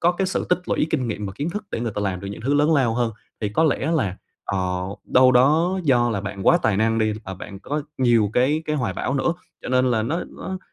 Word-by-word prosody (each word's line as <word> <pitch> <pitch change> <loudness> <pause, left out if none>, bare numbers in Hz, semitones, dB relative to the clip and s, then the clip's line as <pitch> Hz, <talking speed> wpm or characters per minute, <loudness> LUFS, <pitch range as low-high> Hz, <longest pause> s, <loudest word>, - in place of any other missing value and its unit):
có 175 +1 +4
cái 190 +2 -1
sự 190 - -2
tích 180 - +3
lũy - - +1
kinh 130 -6 0
nghiệm 105 -1 -3
và 95 - -6
kiến 150 +4 -2
thức 210 +4 -5
để - - -3
người 115 -3 -2
ta - - -2
làm 95 -2 -2
được 100 - -7
những 100 - -7
thứ 140 +3 +1
lớn 150 +2 +4
lao 125 -5 +2
hơn. 120 -2 0 0.3
Thì 105 - -1
có 135 +10 +2
lẽ 155 0 +1
là, 95 - -1 0.3
ờ, 100 - -2 0.5
đâu 130 0 +5
đó 160 +9 +3
do 120 -4 +3
là 100 - -1
bạn 100 -1 -6
quá - - +6
tài 105 - +2
năng 110 +2 +2
đi, 110 -1 +2
ờ, 95 - -6
bạn 100 +1 -9
có 150 +5 -3 0.2
nhiều 115 -5 +3
cái 145 +6 +2
cái 150 - 0
hoài 120 -9 -1
bão 130 - -2
nữa, 140 +5 +1 0.3
cho - - -6
nên 130 0 +3
là 115 -2 +1
nó 155 +10 -2
nó 190 0 -6
125 Hz, 270 wpm, -23 LUFS, 110-150 Hz, 0.5 s, quá